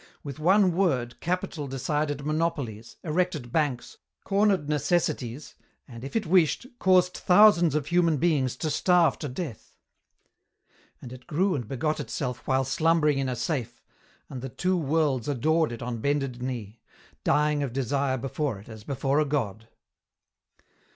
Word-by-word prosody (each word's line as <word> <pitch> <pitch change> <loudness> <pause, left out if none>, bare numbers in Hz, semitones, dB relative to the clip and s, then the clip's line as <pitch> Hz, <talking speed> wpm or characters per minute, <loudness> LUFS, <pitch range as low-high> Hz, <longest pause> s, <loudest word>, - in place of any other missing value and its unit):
With 140 0 -7
one 185 +2 +4
word 130 -11 0
capital 175 -4 -3
decided 145 +2 -2
monopolies, 150 -8 -2
erected 160 -6 -1
banks, 145 -6 -1 0.3
cornered 195 -5 +2
necessities, 150 -4 -1 0.3
and, 120 -3 -10
if 135 - -7
it 220 -2 0
wished, 175 - +3
caused 180 -1 +4
thousands 180 -5 +5
of 150 -3 0
human 170 -1 +2
beings 140 -6 +1
to 155 +4 -3
starve 175 +1 +3
to 145 - -4
death. 130 - -7 1.3
And 125 - -8
it 130 - -13
grew 180 +4 +1
and 125 -7 -3
begot 150 +6 -1
itself 125 -4 -4
while 130 0 +2
slumbering 150 +1 +2
in 135 -1 -1
a 125 - -2
safe, 120 -4 -3 0.5
and 130 - -7
the 135 - -5
Two 185 +8 0
Worlds 150 -6 0
adored 155 +3 +1
it 120 0 -6
on 120 -1 -4
bended 135 -1 -1
knee, 120 -4 -5 0.4
dying 150 0 +2
of 140 -4 -2
desire 135 +1 0
before 135 -1 -3
it 100 +4 -14
as 110 -1 -10
before 140 +3 0
a 155 - +2
God. 115 -7 -2
145 Hz, 150 wpm, -26 LUFS, 125-165 Hz, 1.3 s, thousands